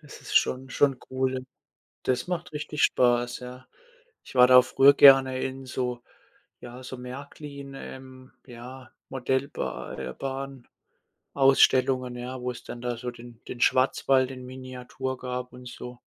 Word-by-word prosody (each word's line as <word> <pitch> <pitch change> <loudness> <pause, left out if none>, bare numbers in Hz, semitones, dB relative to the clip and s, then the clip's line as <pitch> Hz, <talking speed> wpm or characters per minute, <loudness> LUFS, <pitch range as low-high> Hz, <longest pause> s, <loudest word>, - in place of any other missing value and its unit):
das 150 -3 -13
ist - - -2
schon 130 +1 +2
schon 135 -2 +2
cool. 130 0 -1 0.6
Das 125 +5 0
macht 180 -1 -4
richtig 150 0 -2
Spaß, 120 -1 +2
ja. 125 +1 -10 0.6
Ich - - -13
war 125 0 +8
da 125 0 +9
früher 140 +2 +5
gerne 135 -2 +7
in 135 0 -4
so 125 -1 -3 0.6
ja, 125 +1 -10
so 130 - -7
Märklin, 140 +2 -9
ähm, 130 -1 -11
ja, 125 0 -11 0.2
Modellba 130 +2 -3
äh, 65 -1 -5 1.0
Bahn-Ausstellungen, 130 -2 +3
ja, 125 +1 -6
wo's 125 -1 -5
dann 120 - -8
da 120 -1 -3
so 125 +1 -5
den 120 -1 -13
den 120 - -7
Schwarzwald 130 0 +3
in 130 -1 -8
Miniatur 130 0 -6
gab 125 0 -5
und 125 0 -11
so. 125 0 -9
130 Hz, 140 wpm, -26 LUFS, 125-135 Hz, 1.0 s, da